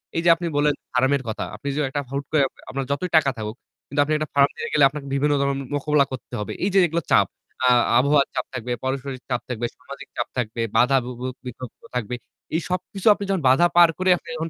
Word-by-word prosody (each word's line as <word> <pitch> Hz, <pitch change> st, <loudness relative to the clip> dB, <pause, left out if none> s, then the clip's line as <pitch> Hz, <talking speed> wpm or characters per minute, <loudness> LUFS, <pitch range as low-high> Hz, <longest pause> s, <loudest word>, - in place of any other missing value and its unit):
এই 165 Hz, -, +1 dB
যে 175 Hz, -, +6 dB
আপনি 170 Hz, +1 st, -6 dB
বললেন 145 Hz, 0 st, +3 dB, 0.2 s
farm 130 Hz, +2 st, +3 dB
এর 130 Hz, -, -9 dB
কথা। 110 Hz, -, -3 dB
আপনি 110 Hz, +7 st, -9 dB
যদি 150 Hz, 0 st, +1 dB
একটা 145 Hz, +1 st, -2 dB
হুট 140 Hz, +1 st, -2 dB
করে 155 Hz, -, +4 dB, 0.3 s
আপনার 135 Hz, 0 st, -3 dB
যতই 180 Hz, +6 st, -1 dB
টাকা 140 Hz, -3 st, +4 dB
থাকুক 110 Hz, 0 st, -5 dB, 0.3 s
কিন্তু 145 Hz, -, -3 dB
আপনি 155 Hz, -, -1 dB
একটা 155 Hz, 0 st, -3 dB
farm 140 Hz, 0 st, +5 dB
দিয়ে -, -, -4 dB
গেলে 150 Hz, -, +4 dB
আপনার 145 Hz, 0 st, -7 dB
বিভিন্ন 145 Hz, +2 st, +2 dB
ধরনের 140 Hz, -1 st, -1 dB
মোকাবেলা 145 Hz, 0 st, +2 dB
করতে 130 Hz, -1 st, -8 dB
হবে। 105 Hz, -, -4 dB
এই 195 Hz, -, +2 dB
যে 195 Hz, -, +6 dB
এগুলো 165 Hz, +2 st, -1 dB
চাপ, -, -, +5 dB, 0.4 s
আ -, -, +5 dB, 0.3 s
আবহাওয়ার 140 Hz, +2 st, +3 dB
চাপ 125 Hz, -, -1 dB
থাকবে, 125 Hz, -1 st, -4 dB
পারস্পরিক 130 Hz, 0 st, -3 dB
চাপ 125 Hz, -1 st, -1 dB
থাকবে, 120 Hz, -1 st, -2 dB
সামাজিক -, -, -10 dB
চাপ -, -, -1 dB
থাকবে, 115 Hz, -1 st, -2 dB, 0.2 s
বাধা 135 Hz, +2 st, +5 dB
বু 125 Hz, -, -5 dB
বু 125 Hz, -, -3 dB, 0.2 s
বিপত্তি 125 Hz, 0 st, -9 dB
থাকবে। 125 Hz, 0 st, -2 dB, 0.4 s
এই 165 Hz, -, +1 dB
সবকিছু 185 Hz, +3 st, -3 dB
আপনি 205 Hz, -, -6 dB
যখন 190 Hz, -3 st, +1 dB
বাধা 170 Hz, +7 st, +5 dB
পার 175 Hz, -1 st, +8 dB
করে 185 Hz, 0 st, +1 dB
আপনি -, -, -18 dB
যখন 160 Hz, +1 st, -3 dB
140 Hz, 230 wpm, -23 LUFS, 125-155 Hz, 0.4 s, পার